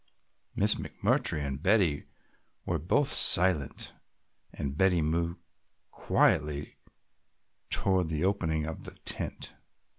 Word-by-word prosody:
Miss - - +2
McMurtry 75 - 0
and, 70 0 -4
Betty 90 -6 +2 0.6
were 85 -2 -1
both 135 - +1
silent 90 -6 +2 0.6
and 70 -1 -5
Betty 90 +1 +3
moved 85 +2 -1 0.5
quietly 75 -1 0 0.9
toward 95 -4 +2
the 75 0 -2
opening 80 -6 0
of 80 0 -7
the - - -9
tent. - - -5
80 Hz, 100 wpm, -29 LUFS, 75-95 Hz, 0.9 s, Betty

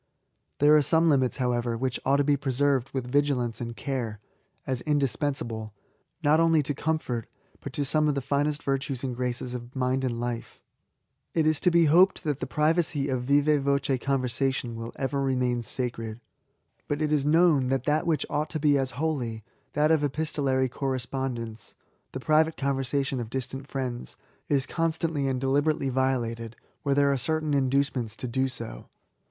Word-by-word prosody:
There 150 +1 +6
are 150 - +6
some 165 +3 +3
limits, 130 -4 +2
however^ 120 -2 0
which 130 +1 -2
ought 135 - +3
to 145 - +3
be 145 0 +3
preserved 135 -1 +1
with 125 -2 -4
vigil 145 -1 +2
ance 120 -1 -3
and 120 -1 -5
care, 120 -7 -3 0.5
as 130 -2 -2
indispensable, 135 -6 -1 0.5
not 150 +2 +4
only 165 -2 +4
to 145 - -2
com* 160 +3 0
fort, 120 -6 -4 0.3
but 140 - -7
to 145 - -1
some 150 +2 +2
of 145 - +1
the - - +1
finest 145 +3 0
virtues 135 -1 -2
and 130 -2 -2
graces 125 0 -3
of 125 +1 -7
mind 130 0 0
and 120 -3 -1
life* 120 -1 -4 0.8
It 160 -2 +3
is 155 -1 +2
to 180 - +3
be 170 -1 +4
hoped 180 +7 +5
that 150 -4 -1
the - - -3
privacy 150 -2 +1
of 125 -2 -1
vivd 145 +2 +3
voce 140 -1 +1
conversation 130 -2 -1
will 115 +1 -6
ever 135 +1 -1
remain 125 -2 +1
sacred: 115 -2 -3 0.7
but 145 - -1
it 155 -1 0
is 150 -2 +2
known 150 -3 +4
that 135 -1 0
that 150 +3 +1
which 160 -3 +1
ought 150 +1 -1
to 155 - -3
be 145 -2 +3
as 130 -2 -3
holy, 130 -8 -2 0.3
that 150 +2 +3
of 155 -2 +3
epistolary 140 -3 0
corre8pondence, 130 -3 -4 0.4
(the 130 - -5
private 155 +3 +2
con^ 140 0 0
versation 135 0 -1
of 115 -2 -5
distant 135 +2 -5
Mends,) 125 -2 -4 0.3
is 140 -2 +1
constantly 160 -3 -1
and 130 -1 0
deli< 135 +2 +2
berately 145 -3 0
violated, 120 -3 -1 0.3
where 140 -1 +1
there 140 0 +4
are 140 - +1
certain 155 +3 -1
induce 140 0 +2
ments 115 -4 -3
to 125 - -5
do 130 +2 0
so. - - -7
135 Hz, 180 wpm, -27 LUFS, 125-150 Hz, 0.8 s, There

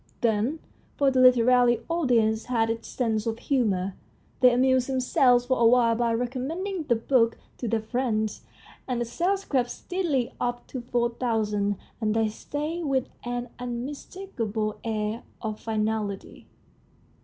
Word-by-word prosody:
Then 230 +6 +1 0.4
for 280 -1 +3
the 260 - +2
literary 245 -1 +5
audience 235 -10 +2
has 225 -2 +1
its 225 0 -5
sense 225 -3 -1
of 225 0 -1
humour 200 -9 0 0.5
they 250 -1 +7
amused 255 +1 +3
themselves 255 -1 +3
for 260 -1 +1
a 235 - +4
while 235 -1 +5
by 235 0 +1
recommending 300 - -3
the 240 - +3
book 230 0 +2 0.2
to 245 - -3
their 225 0 0
friends, 220 -2 -1 0.5
and 250 -2 -1
the 240 - 0
sales 380 - -1
crept 250 -4 +1
steadily 320 -10 -2
up 245 0 -2
to 255 - -5
four 240 0 0
thousand, 210 -4 0 0.3
and 215 0 +1
there 225 -1 +2
stayed 305 +8 -4
with 265 -3 0 0.2
an 245 0 -3
unmis 250 +3 -5
takable 225 - -3
air 220 0 -2 0.2
of 215 -2 -4
finality. 215 -2 -3
240 Hz, 145 wpm, -26 LUFS, 225-260 Hz, 0.5 s, they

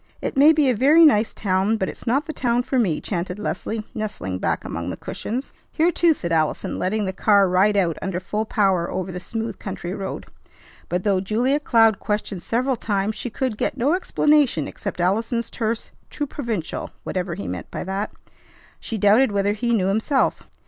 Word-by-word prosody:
"It - - -4
may 285 +3 +7
be 305 -3 +3
a 255 - +3
very 300 +8 +6
nice 220 -7 +4
town, 195 +2 0
but 190 - -1
it's - - -8
not 275 +6 +2
the 315 - -5
town 245 -2 +1
for 260 +1 0
me," 180 -10 +1
chanted 180 -1 -3
Leslie, 215 +1 -3
nestling 95 - -4
back - - -1
among - - -4
the - - -5
cushions. 250 +5 -5 0.2
"Here, 335 +2 +2
too!" 335 -1 +3
said 170 -9 -4
Allison, 155 -2 0
letting 210 +3 0
the 190 - -2
car 200 0 +4
ride 195 +3 +3
out 170 -5 +1
under 185 -2 -2
full 210 +4 -2
power 190 -5 +1
over 185 0 -3
the 180 - -5
smooth 225 +4 -5
country 185 -2 -5
road. 195 -1 -5 0.6
But, 180 +1 -1
though 200 -3 +2
Julia 240 +8 +1
Cloud 225 -7 +4
questioned 210 -3 -2
several 250 +7 0
times, 205 -1 -1
she 245 - -4
could 240 -2 -3
get - - -1
no 270 +6 +2
explanation 295 - +2
except - - -6
Allison's 225 +6 0
terse 225 0 -3 0.2
"Too 295 - -3
provincial," 235 - -4
whatever 180 -2 -3
he 100 - -6
meant 90 -1 -5
by - - -5
that. 195 +3 -3 0.7
She 225 - -4
doubted 210 +5 +4
whether 200 0 +1
he 235 +3 -1
knew 210 -5 +2
himself. 220 +8 +1
215 Hz, 190 wpm, -22 LUFS, 190-245 Hz, 0.7 s, may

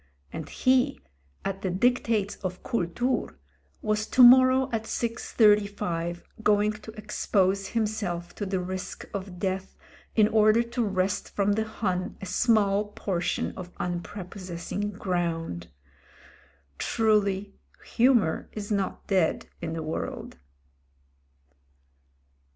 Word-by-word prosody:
And 160 -2 -6
he 255 - +2 0.2
— 70 0 -35
^at 195 0 -3
the 190 - -1
dictates 220 0 +1
of 185 -2 -5
^'Kultur*' 235 - -1 0.2
— 70 +1 -37
^was 215 0 0
to 255 - +6
morrow 255 +1 +7
at 225 -1 -2
6.35 205 -7 +1 0.2
going 210 0 +3
to 215 +1 -10
expose 200 -2 0
himself 205 -6 -2
to 205 - -4
the 190 -1 -1
risk 185 +1 -5
of 190 -2 -5
death, 190 +1 -3 0.4
in 215 -2 +5
order 215 +1 +4
to 235 +1 -2
wrest 195 -1 -1
from 200 0 +2
the 220 +1 0
Hun 185 -4 -2
a - - -7
small 205 +1 +2
portion 180 -4 -1
of 180 -1 -9
unpre 180 +2 -4
possessing 185 +2 -5
ground. 170 - -2 1.1
Truly, 205 -3 +1 0.3
humour 235 -9 +2
is 210 0 -6
not 200 -2 -1
dead 185 -5 +1 0.2
in 160 - -3
the 165 -1 -3
world! 155 - -5
200 Hz, 120 wpm, -27 LUFS, 180-215 Hz, 1.1 s, morrow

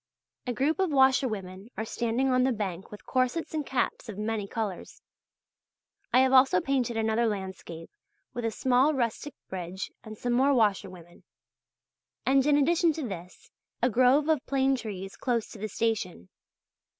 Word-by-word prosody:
A - - 0
group 290 - 0
of 380 -2 +2
washerwomen 230 -8 +1
are 220 - -2
standing 235 +4 -1
on 255 0 +3
the 260 - +2
bank 195 -5 -4
with 210 - -12
corsets 255 +7 -1
and 310 -1 -1
caps 250 -3 -2
of 205 - -7
many 210 -1 -2
colours. 205 -4 -5 1.1
I 255 - +5
have 260 0 +3
also 260 -8 +6
painted 250 -1 -1
another 225 +1 +1
landscape 190 -5 -6 0.4
with 240 - -4
a 225 - +1
small 260 +6 +2
rustic 250 +3 -2
bridge 185 0 -6
and 215 -1 -9
some 245 +2 -1
more 270 +3 +3
washerwomen, 190 -6 -1 1.0
and 270 0 +4
in 290 -1 +5
addition 330 +3 +3
to 300 -4 -4
this, 180 -3 -9 0.3
a 245 +1 +2
grove 255 +6 +4
of 310 -4 +2
plane 270 0 +2
trees 195 -6 -6
close 235 -4 -1
to 215 - -10
the 215 - -3
station. 190 - -2
235 Hz, 160 wpm, -28 LUFS, 205-265 Hz, 1.1 s, also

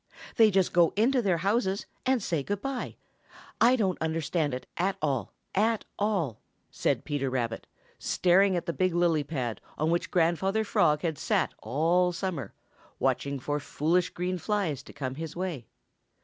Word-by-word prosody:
"They 225 -1 +7
just 190 -2 +2
go 170 -1 +4
into 245 +5 +3
their 190 -6 +2
houses 195 +2 0 0.2
and 260 -5 +2
say 165 -6 0
good 200 +8 -3
by. 275 -2 -3 0.7
I 245 +2 +6
don't 195 -7 0
understand 160 -1 0
it 130 - -7
at 190 +3 0
all, 135 -9 -1 0.2
at 220 +3 +1
all," 190 - 0 0.3
said - - 0
Peter 145 -3 -1
Rabbit, 120 -3 -2 0.3
staring 185 +2 +3
at 175 - -2
the 170 - -2
big 185 -1 +1
lily 170 -3 +3
pad 130 -6 -3 0.2
on 155 +2 +1
which 170 - 0
Grandfather 185 +5 +2
Frog 170 -8 +2
had 160 -4 -1
sat - - +1
all 170 +6 +2
summer, 175 -6 -4 0.5
watching 140 0 0
for 145 +3 -2
foolish 165 +5 +1
green 180 +1 -3
flies 185 - -1
to - - -13
come 130 -2 -4
his 160 +2 -6
way. 170 - -4
175 Hz, 165 wpm, -28 LUFS, 150-195 Hz, 0.7 s, They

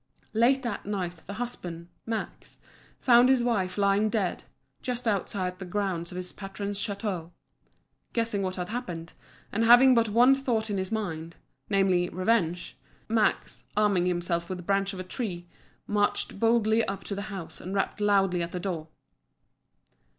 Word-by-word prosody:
Late 250 +4 +3
that 230 -5 -4
night 180 -5 -3
the 200 - -5
husband, 180 -7 -4 0.2
Max, 225 -1 -5 0.4
found 245 0 +6
his 260 -2 +4
wife 195 -6 0
lying 200 +1 +3
dead, 205 -4 -1 0.4
just 245 -1 -3
outside 185 -3 -1
the - - -5
grounds 180 -3 -2
of - - -8
his 180 0 -5
patron's 200 0 -5
château. 200 -5 -3 0.8
Guessing 230 -3 0
what 185 -1 -2
had 180 -1 -4
happened, 175 -9 -5 0.4
and 220 +3 +1
having 245 +3 +8
but 230 -2 +3
one 245 +5 +6
thought 235 -5 0
in 200 - 0
his 190 +2 -3
mind 170 -7 -3 0.3
namely, 190 -3 +2
revenge 180 - 0 0.3
Max, 220 -1 0
arming 200 -4 +3
himself 175 -1 -1
with 185 - -3
the 180 - -9
branch 195 +1 +1
of 190 - -7
a - - -3
tree, 185 -3 -4 0.4
marched 205 -1 0
boldly 225 0 +3
up 195 0 -4
to - - -4
the 200 +1 -5
house, 190 -5 -6
and 185 +3 -5
rapped 195 +2 -1
loudly 195 -3 +3
at 170 0 -3
the 180 - -2
door. 175 -4 -3
200 Hz, 160 wpm, -28 LUFS, 180-225 Hz, 0.8 s, having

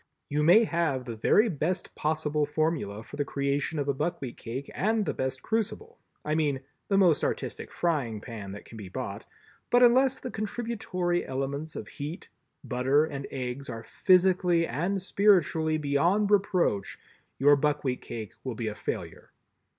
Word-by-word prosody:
You 150 +1 0
may 175 +9 +7
have 165 - 0
the 115 -1 -5
very 210 - +4
best 175 0 -2
possible 150 -1 0
formula 150 -10 -1
for 145 - -11
the 145 - +1
creation 140 +2 -1
of 145 -1 -1
a 140 - +2
buckwheat 135 -3 -3
cake 130 +4 -6
and 215 +2 +1
the - - -1
best 130 0 -3
crucible—I 225 - -4
mean 145 -4 +1 0.3
the 195 - +2
most 175 -7 +4
artistic - - -3
frying 140 -11 -1
pan 105 -3 -7
that 100 - -10
can 115 - -11
be 100 -3 -8
bought; - - -5 0.4
but 245 +1 +5
unless 255 +2 +5
the 250 - -6
contributory 205 -5 -2
elements 140 +4 -4
of - - -6
heat, 150 +5 -7 0.3
butter 135 +4 +2
and 140 -3 -6
eggs 130 +1 -5
are 115 -2 -6
physically 180 - +3
and 175 +9 -1
spiritually 175 -5 +3
beyond 170 +8 +2
reproach, 180 - +1 0.4
your 145 +1 +6
buckwheat 145 -3 0
cake 110 -3 -7
will 130 -3 -4
be 110 -1 -2
a - - -5
failure. - - -5
150 Hz, 160 wpm, -28 LUFS, 130-185 Hz, 0.4 s, may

